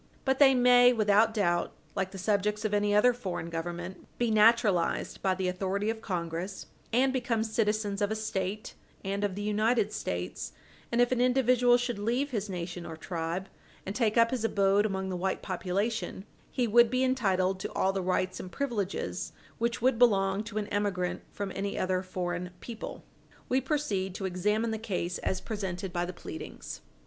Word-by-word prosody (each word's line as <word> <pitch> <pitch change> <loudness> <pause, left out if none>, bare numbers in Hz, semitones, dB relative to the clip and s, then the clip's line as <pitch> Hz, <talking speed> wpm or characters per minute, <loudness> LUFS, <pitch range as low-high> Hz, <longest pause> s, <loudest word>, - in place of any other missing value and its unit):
But 265 0 +2
they 270 -2 +7
may, 245 0 +7
without 215 0 +4
doubt, 175 -6 0 0.2
like 190 -1 -1
the 195 - -9
subjects 210 +2 0
of 210 - 0
any 205 0 +2
other 245 +4 +5
foreign 185 -8 -5
Government, 175 +2 -5
be 240 -2 +1
naturalized 215 -5 +3
by 190 -1 +2
the 185 0 -1
authority 195 +3 -1
of 225 -1 -7
Congress, 175 0 -4 0.3
and 260 +3 +3
become 245 -4 0
citizens 215 -2 0
of 205 - +2
a 220 - -1
State, 210 -1 -3 0.3
and 200 +1 -1
of 200 -2 0
the 205 - -4
United 215 +1 +1
States, 90 - -4 0.4
and 240 +1 +3
if 245 - +3
an 250 -1 +2
individual 250 -1 +4
should 245 -3 -2
leave 245 +7 0
his 210 -4 -2
nation 175 -1 -5
or 160 -1 -7
tribe 170 +2 -3 0.4
and 195 - -4
take 225 -2 +1
up 230 0 +5
his 250 -4 -1
abode 200 -1 +3
among 190 -1 -3
the 185 - -2
white 190 +2 -2
population, 195 +3 -2 0.2
he 250 - 0
would 235 +1 +6
be 255 +2 +1
entitled 195 -8 +1
to - - -4
all 190 - +1
the 195 - -1
rights 185 0 0
and 185 - -7
privileges 225 -8 -3 0.3
which 235 0 -1
would 255 -2 +3
belong 195 -4 +4
to 215 -1 -6
an 210 - 0
emigrant 200 -3 -1
from 200 -1 -4
any 200 +1 -3
other 185 0 0
foreign 180 -1 -3
people. 230 -2 -7 0.5
We 260 +1 +3
proceed 215 - -1
to 195 - -4
examine 210 +5 0
the 220 - -3
case 180 -5 -2
as 185 - -1
presented 195 -4 -4
by 175 -1 0
the 180 - -4
pleadings. 320 - -8
205 Hz, 180 wpm, -29 LUFS, 185-230 Hz, 0.5 s, they